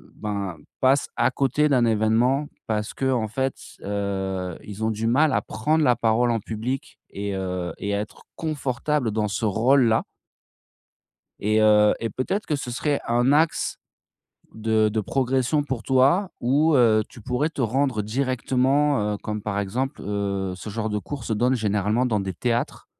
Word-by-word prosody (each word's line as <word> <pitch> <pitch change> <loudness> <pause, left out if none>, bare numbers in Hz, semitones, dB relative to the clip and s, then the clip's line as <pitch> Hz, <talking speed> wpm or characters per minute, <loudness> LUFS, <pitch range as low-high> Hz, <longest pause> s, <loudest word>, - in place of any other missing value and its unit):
ben 100 -4 -4 0.2
passe 135 +2 +3
à 120 +1 +3
côté 135 +3 +1
d'un 125 -4 +3
évènement. 115 +6 +2 0.2
Parce 105 -1 -2
qu'en 130 -4 0
fait, 130 +5 -1
s - - -14
heu, 95 -3 -3
ils 105 +1 -7
ont 110 - +2
du 110 +1 -3
mal 145 +7 +3
à - - +2
prendre 155 +9 0
la 125 -4 +4
parole 120 +1 +2
en 115 - 0
public 115 +5 -5
et 100 0 -4
heu 90 -2 -3
et 100 0 -3
à 100 - 0
être 105 - -8
confortable 145 -4 -1
dans 105 0 0
ce 105 +3 -2
rôle 120 +6 +3
là 115 -1 +3 1.4
et 110 +1 +2
heu, 105 -1 +5
et 115 - -2
peut-être 190 - -2
que 150 - 0
ce 140 -3 -5
serait 145 +4 0
un 120 +3 +3
axe 155 +2 +2 0.8
de 110 -1 +2
de 110 +1 0
progression 130 +5 +1
pour 135 -5 -4
toi 140 - +3
où 145 +6 +3
heu, 110 -4 +5
tu 120 - -14
pourrais 125 +8 0
te 140 -4 -3
rendre 125 -1 +1
directement, 130 0 +1
heu, - - -3
comme 105 +1 -4
par 100 -1 -2
exemple, 125 +8 -2
heu, 100 -2 -2
ce 95 - -8
genre 110 +1 -3
de 105 - -1
cours 135 +4 -7
se 115 - -2
donne 125 +4 +2
généralement 105 +1 +1
dans 110 -4 +1
des 95 -1 -4
théâtres 120 +5 -2
115 Hz, 175 wpm, -24 LUFS, 105-135 Hz, 1.4 s, heu